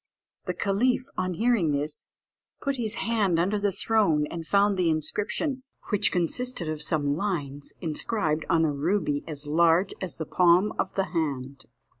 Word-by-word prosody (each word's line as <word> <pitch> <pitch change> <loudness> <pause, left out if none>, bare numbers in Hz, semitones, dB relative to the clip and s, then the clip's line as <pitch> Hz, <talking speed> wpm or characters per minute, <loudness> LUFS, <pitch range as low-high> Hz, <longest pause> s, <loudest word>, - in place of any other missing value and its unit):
The - - -2
caliph, 245 +6 +1
on 185 -1 -2
hearing 220 -8 +2
this, 150 +1 -3 0.5
put 275 -2 -2
his 230 -2 -2
hand 210 -7 +2
under 195 +5 +1
the 200 0 +1
throne, 195 -6 +2
and 165 -1 -6
found 200 0 +3
the 180 -3 +1
inscription, 210 - -1 0.3
which 205 -1 +4
consisted 180 +2 -1
of 155 -1 -3
some 145 -4 +2
lines, 145 -7 -3
inscribed 160 -1 -1
on 165 -1 +3
a 155 - +1
ruby 145 -1 0
as 150 -2 -5
large 170 +5 +3
as 185 -3 -4
the 160 - -4
palm 180 +5 +3
of - - -2
the 195 -1 0
hand. 140 -5 -3
175 Hz, 160 wpm, -26 LUFS, 155-205 Hz, 0.5 s, which